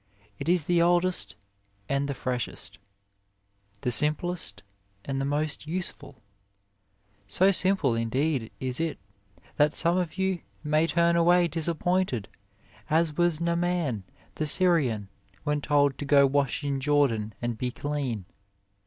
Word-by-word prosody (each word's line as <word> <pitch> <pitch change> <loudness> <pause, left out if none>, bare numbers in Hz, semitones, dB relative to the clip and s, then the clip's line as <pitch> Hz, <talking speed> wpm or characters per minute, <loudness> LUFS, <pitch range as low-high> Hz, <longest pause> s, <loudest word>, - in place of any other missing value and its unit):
It 140 - -3
is 175 -2 +3
the 170 +2 +2
oldest 175 +1 +1 0.5
and 140 0 0
the 140 - -2
freshest, 120 -6 -4 1.0
the 125 - -1
simplest 150 - 0 0.4
and 135 -1 -2
the - - -1
most 150 +2 -2
useful, 150 - -5 1.0
so 190 - +3
simple 190 -8 +2
in 115 0 -1
deed 135 -2 0
is 130 -1 -2
it 165 -1 -1 0.6
that 150 +1 +3
some 170 +2 +2
of 180 -1 -2
you 190 -1 0 0.2
may 155 +2 +2
turn 170 0 +2
away 175 +1 +4
disappointed 170 - -1 0.6
as 160 -1 +2
was 175 -2 +2
Naaman 170 - 0 0.3
the 155 - -2
Syrian 145 - +2 0.4
when 150 0 0
told 145 -2 +2
to 145 - -3
go 140 -1 +6
wash 140 +1 0
in 140 -1 -1
Jordan 130 -8 +1
and 120 -1 -2
be 125 +3 -2
clean. 130 -6 -3
150 Hz, 135 wpm, -27 LUFS, 130-170 Hz, 1.0 s, go